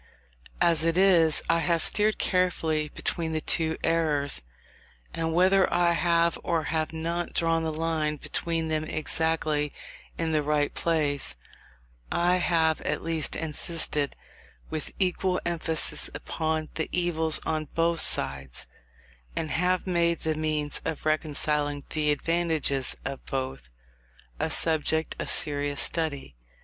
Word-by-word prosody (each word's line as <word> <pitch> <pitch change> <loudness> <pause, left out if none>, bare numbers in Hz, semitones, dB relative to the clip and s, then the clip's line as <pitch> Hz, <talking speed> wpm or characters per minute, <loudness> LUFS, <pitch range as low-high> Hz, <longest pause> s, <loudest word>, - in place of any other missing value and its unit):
As 170 -2 +4
it 165 +1 +1
is, 170 -5 +4
I 170 - +3
have 165 -1 +1
steered 215 +1 +2
carefully 160 -5 0
between 165 -2 -1
the 160 - 0
two 160 0 +1
errors, 150 - +1 0.7
and 165 0 -2
whether 185 +3 +3
I 175 -1 +3
have 170 0 +2
or 165 -2 0
have 155 -1 -1
not 170 +2 -3
drawn 165 -1 +2
the 160 - -1
line 155 -1 -1
between 165 +2 -2
them 155 -1 -1
exactly 155 -1 -1 0.5
in 165 -1 -1
the 155 -1 +2
right 150 0 0
place, 150 -4 +1 0.8
I 175 +1 +2
have 165 -3 +1
at - - -2
least 165 -3 -2
insisted 155 -2 -2 0.6
with 155 - -4
equal 185 -1 0
emphasis 165 -2 +1
upon 160 -1 -3
the 160 - -3
evils 160 -3 +2
on 155 -1 -1
both 165 0 +2
sides, 65 -2 +3 0.7
and 160 -1 -3
have 180 +2 +1
made 170 -2 +1
the 160 - 0
means 155 -1 -2
of 155 - -4
reconciling 150 -2 0
the 150 -1 0
advantages 155 -3 0
of 135 - -5
both, 130 - -4 0.7
a - - 0
subject 160 0 +2
of - - -1
serious 145 -1 +2
study. 140 - -1
160 Hz, 130 wpm, -27 LUFS, 150-170 Hz, 0.8 s, As